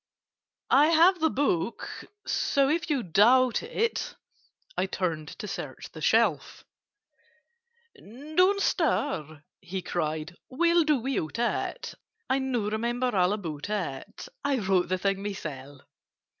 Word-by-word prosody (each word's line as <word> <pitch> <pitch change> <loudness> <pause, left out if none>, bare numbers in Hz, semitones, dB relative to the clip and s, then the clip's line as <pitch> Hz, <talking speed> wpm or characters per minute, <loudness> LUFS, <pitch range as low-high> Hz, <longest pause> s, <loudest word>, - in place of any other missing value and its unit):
"I 290 +3 +6
have 335 +3 +5
the 320 0 +3
book; 245 - -1 0.4
so 275 -1 +1
if 330 +2 0
you 280 -5 +1
doubt 240 +8 +4
it—" 460 -1 -2 0.6
I - - 0
turned 165 -5 -2
to 210 - -6
search - - -7
the - - -10
shelf. - - +1 1.3
"Don't 310 - 0
stir!" 175 - 0 0.2
he 190 0 -5
cried. 160 0 -3
"We'll 340 +4 +3
do 300 -2 +3
without 240 - -2
it: 240 0 -2 0.3
I 265 - +1
now 245 -6 -1
remember 240 +2 -1
all 180 0 +3
about 165 -5 -4
it; 175 -11 -4 0.2
I 280 -1 +1
wrote 190 -5 +1
the 185 - +1
thing 195 +1 -1
myself. 145 -9 -7
225 Hz, 125 wpm, -27 LUFS, 180-285 Hz, 1.3 s, I